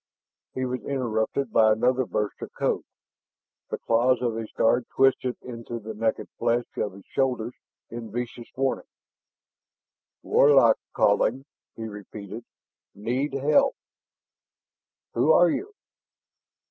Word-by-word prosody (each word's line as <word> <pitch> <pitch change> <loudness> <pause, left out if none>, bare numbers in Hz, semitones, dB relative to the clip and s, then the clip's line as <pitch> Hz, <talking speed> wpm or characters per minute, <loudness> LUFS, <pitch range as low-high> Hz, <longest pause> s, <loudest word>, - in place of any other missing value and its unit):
He 130 - -1
was 125 0 -3
interrupted 125 -1 -1
by 110 -1 +6
another 125 +3 +2
burst 105 -1 -2
of - - -6
code. - - 0 0.9
The - - -2
claws 120 +2 +2
of 120 -2 0
his 115 -1 -5
guard 120 +2 +2
twisted 130 -1 +3
into 120 -1 -6
the 110 0 -7
naked 110 +1 -1
flesh 120 +1 +1
of 100 - -1
his 95 0 -14
shoulders 125 -3 -1 0.4
in 115 -2 -7
vicious 120 0 -5
warning. 135 0 -1 1.4
"Warlock 135 -6 +5 0.2
calling 115 +6 +2
" - - -67
he 115 - -5
repeated. 105 +1 -8 0.5
"Need 125 +7 -2
help 140 +2 +3 0.7
" - - -67
"Who 145 +7 +4
are 175 -1 +6
you?" 415 +3 -3
120 Hz, 125 wpm, -26 LUFS, 110-130 Hz, 1.4 s, by